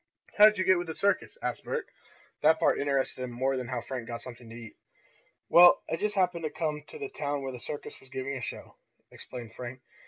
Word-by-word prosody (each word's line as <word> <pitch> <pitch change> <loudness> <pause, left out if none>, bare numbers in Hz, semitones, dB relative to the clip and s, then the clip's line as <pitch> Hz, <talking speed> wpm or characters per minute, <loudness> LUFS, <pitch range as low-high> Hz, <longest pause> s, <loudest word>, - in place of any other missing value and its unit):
"How 210 - +11
did 215 -1 +6
you 185 - +1
get 185 -2 +4
with 175 - -4
the 160 - -5
circus?" 200 - 0
asked - - -2
Bert. 475 0 -3 0.6
That 160 +2 +5
part - - +3
interested 140 -2 0
him 125 - -3
more 130 +3 0
than 130 -2 -3
how 125 -1 -3
Frank 125 -3 -6
got 120 -1 -5
something 120 -2 -10
to 115 - -10
eat. 115 -2 -10 0.7
"Well, 175 0 +8
I - - +2
just 210 +4 -1
happened 180 -3 +1
to 155 - -1
come 150 -1 -2
to - - -10
the 425 -2 -4
town 145 - -3
where 135 - -3
the 125 - -8
circus 145 +4 -6
was 135 - -17
giving 135 +1 -4
a 130 - -5
show," - - -7 0.3
explained 120 -3 -9
Frank. 125 +1 -7
140 Hz, 230 wpm, -29 LUFS, 125-175 Hz, 0.7 s, How